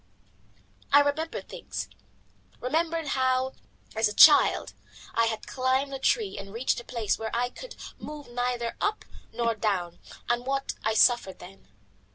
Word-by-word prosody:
I 285 - +8
remembered 290 +3 -2
things: - - -6 0.7
remembered 320 +3 -1
how, 260 0 +1 0.4
as 220 0 +3
a 210 - -5
child, 305 -2 +6 0.4
I 230 0 +3
had 220 -1 -3
climbed 260 +2 0
a 270 - -4
tree 415 - 0
and 195 0 -9
reached 235 +4 0
a - - -9
place 235 -4 -2
whence 225 +1 -4
I 245 +1 0
could - - -10 0.2
move 300 -1 -8
neither 245 -1 -2
up 420 +1 -1 0.3
nor 235 -1 0
down, 195 -6 -2 0.3
and 240 +1 -1
what 275 0 -1
I 220 0 0
suffered 220 -4 +3
then. 185 - -14
245 Hz, 150 wpm, -27 LUFS, 225-285 Hz, 0.7 s, I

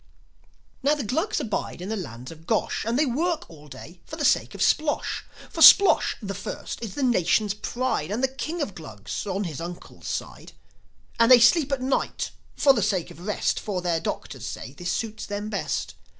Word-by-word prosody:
Now, 285 +2 +3
the 295 - -4
Glugs 315 - -1
abide 210 -5 -3
in 180 +3 -6
the 220 - -1
lands 125 - -7
of 160 0 -14
Gosh; 220 -2 0
And 235 +2 +1
they 305 - +3
work 315 +6 -1
all 150 -2 -14
day 145 +6 -11
for 315 - -8
the 300 -2 -2
sake - - +2
of - - -7
Splosh. 300 -1 +1 0.3
For - - -6
Splosh, 395 -5 +8
the 200 -1 -3
First, 195 +4 -6
is 220 -5 -6
the 285 - -2
Nation's 210 -3 +2
pride, 240 -5 -2
And 240 +6 +1
King 310 +3 -3
of - - -3
the - - -16
Glugs, 130 - -7
on 195 +1 -1
his 165 -5 -5
uncle's 175 +1 -8
side. - - -5 0.7
And 230 +2 +5
they 250 - +10
sleep 275 +5 +5
at 270 -2 -1
night, 265 +1 -1 0.2
for 275 - +5
the 230 - 0
sake 190 -4 0
of 175 +4 -11
rest; 210 - 0
For 200 -4 -3
their 175 -2 0
doctors 130 -5 -5
say 130 - -7
this 175 +4 -4
suits 220 +2 -4
them 205 +1 -4
best. 200 - -2
210 Hz, 200 wpm, -25 LUFS, 175-265 Hz, 0.7 s, they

